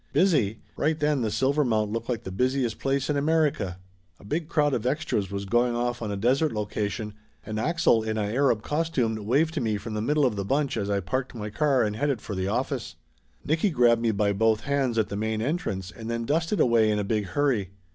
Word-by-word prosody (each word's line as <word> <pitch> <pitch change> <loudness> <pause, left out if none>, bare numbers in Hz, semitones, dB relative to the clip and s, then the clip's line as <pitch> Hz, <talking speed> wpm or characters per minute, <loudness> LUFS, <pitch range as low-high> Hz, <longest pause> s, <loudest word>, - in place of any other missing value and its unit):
Busy? 135 - +2
Right 155 +1 0
then 150 -2 +1
the 110 - 0
Silvermount 120 -5 +1
looked 115 +2 -4
like 120 -4 -2
the 95 - -6
busiest 125 +2 0
place 135 0 0
in 150 - 0
Amer 155 +1 +3
ica. 95 -7 -5 0.4
A - - -16
big 155 +8 -2
crowd 150 -3 +2
of 120 0 -1
extras 110 - -1
was 100 0 -4
going 120 +4 +2
off 120 0 -1
on 110 -2 -3
a 100 - -3
desert 130 +8 +2
location, 105 0 -3 0.3
and 110 0 -3
Axel 155 -4 +3
in 110 0 -2
a 105 - 0
Arab 115 +1 +1
costume 150 -7 0
waved 155 +7 +2
to 155 - -2
me 110 -3 0
from 110 +2 -7
the 105 - -2
middle 145 +5 +2
of 115 -5 0
the 100 - -1
bunch 140 +6 0
as 100 -3 -2
I 100 -1 +1
parked 130 +8 -3
my 105 -2 -5
car 140 +2 +2
and 105 -1 -1
headed 140 0 0
for 105 - -7
the 95 0 -2
office. 100 - -2 0.5
Nicky 160 +7 +2
grabbed 120 -6 +3
me 115 - +2
by 100 -1 +1
both 110 +1 +2
hands 140 -4 0
at 110 -2 +1
the - - -4
main 110 +1 -1
entrance, 110 - -2
and 115 -1 -8
then 115 0 -2
dusted 165 - 0
away 115 -5 +4
in 105 - +1
a 105 - 0
big 105 +1 -1
hurry. 105 -1 0
115 Hz, 225 wpm, -26 LUFS, 105-140 Hz, 0.5 s, away